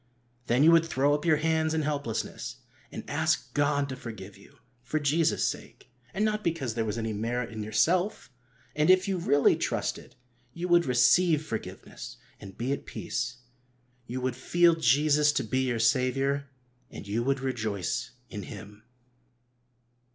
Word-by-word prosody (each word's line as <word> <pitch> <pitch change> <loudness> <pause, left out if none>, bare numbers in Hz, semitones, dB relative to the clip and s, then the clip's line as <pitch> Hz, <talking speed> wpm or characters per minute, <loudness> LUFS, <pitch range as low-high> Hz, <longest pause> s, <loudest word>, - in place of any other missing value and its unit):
Then 125 +4 +3
you 165 - +7
would 165 -1 +5
throw 140 -1 +2
up 150 +3 -1
your 160 -2 +4
hands 160 0 +1
in 155 - 0
helplessness, 145 -6 -3 0.4
and - - -8
ask - - 0
God 145 -1 +1
to 130 - -4
forgive 110 -6 -9
you 100 - -19 0.2
for 135 +5 -2
Jesus' 150 +2 +1
sake, 125 - -7 0.2
and 210 +4 0
not 215 0 -1
because 160 -9 -1
there 115 0 -1
was 105 +1 -3
any 110 -1 -2
merit 115 +3 -2
in 110 -1 -6
yourself. 165 - 0 0.4
And, 150 +3 +2
if 185 +1 +5
you 190 -2 -1
really 145 -4 +3
trusted, - - -3 0.4
you 175 +1 -3
would 175 -2 +4
receive 150 +6 +4
forgiveness, 110 -7 -7 0.2
and 95 -1 -11
be 125 +3 -2
at - - -6
peace. 125 +1 -4 0.7
You 125 +2 -4
would 130 -1 -1
feel 170 +6 +3
Jesus 150 +1 +3
to - - 0
be 130 +3 -1
your 120 -2 0
Saviour, 135 +4 +1 0.4
and 100 - -10
you 105 +3 -1
would 135 +2 0
rejoice 110 -8 -2 0.2
in 105 - -7
Him. 105 +2 -10
135 Hz, 160 wpm, -28 LUFS, 115-160 Hz, 0.7 s, you